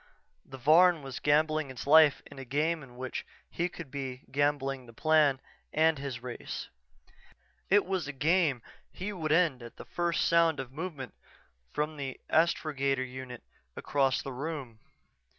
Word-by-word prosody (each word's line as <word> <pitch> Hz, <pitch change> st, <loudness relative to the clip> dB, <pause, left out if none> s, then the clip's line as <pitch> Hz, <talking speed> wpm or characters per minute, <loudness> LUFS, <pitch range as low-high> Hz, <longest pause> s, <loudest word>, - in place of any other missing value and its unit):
_" -, -, -27 dB
The 135 Hz, -, -7 dB
Varn 160 Hz, +4 st, +5 dB
was 135 Hz, -2 st, -6 dB
gambling 155 Hz, 0 st, +2 dB
its 130 Hz, -2 st, -7 dB
life 150 Hz, 0 st, +6 dB
in -, -, -12 dB
a -, -, -6 dB
game 150 Hz, +6 st, 0 dB
in 125 Hz, -3 st, -13 dB
which 130 Hz, 0 st, -4 dB, 0.3 s
he 175 Hz, +1 st, -1 dB
would 160 Hz, -6 st, -8 dB
be 135 Hz, -2 st, -5 dB
gambling 135 Hz, -2 st, 0 dB
the 115 Hz, -, -13 dB
Plan 150 Hz, 0 st, +3 dB, 0.3 s
and 160 Hz, -1 st, +3 dB
his 130 Hz, -3 st, -5 dB
race. 125 Hz, -1 st, -6 dB, 1.0 s
It 205 Hz, +1 st, +5 dB
was 185 Hz, -4 st, -2 dB
a -, -, -3 dB
game 150 Hz, -3 st, +1 dB, 0.3 s
he 205 Hz, +3 st, -5 dB
would 160 Hz, -5 st, -3 dB
end 155 Hz, -6 st, +3 dB
at 120 Hz, -1 st, -11 dB
the -, -, -9 dB
first 170 Hz, -1 st, 0 dB
sound 165 Hz, -2 st, +3 dB
of 130 Hz, -2 st, -6 dB
movement 150 Hz, -, -6 dB, 0.6 s
from 150 Hz, +1 st, -2 dB
the 135 Hz, -2 st, -5 dB
astrogator 140 Hz, -5 st, +1 dB
unit 125 Hz, -1 st, -8 dB, 0.3 s
across 135 Hz, -2 st, +1 dB
the 135 Hz, -, -6 dB
room.... 135 Hz, -4 st, -5 dB
145 Hz, 160 wpm, -30 LUFS, 130-160 Hz, 1.0 s, life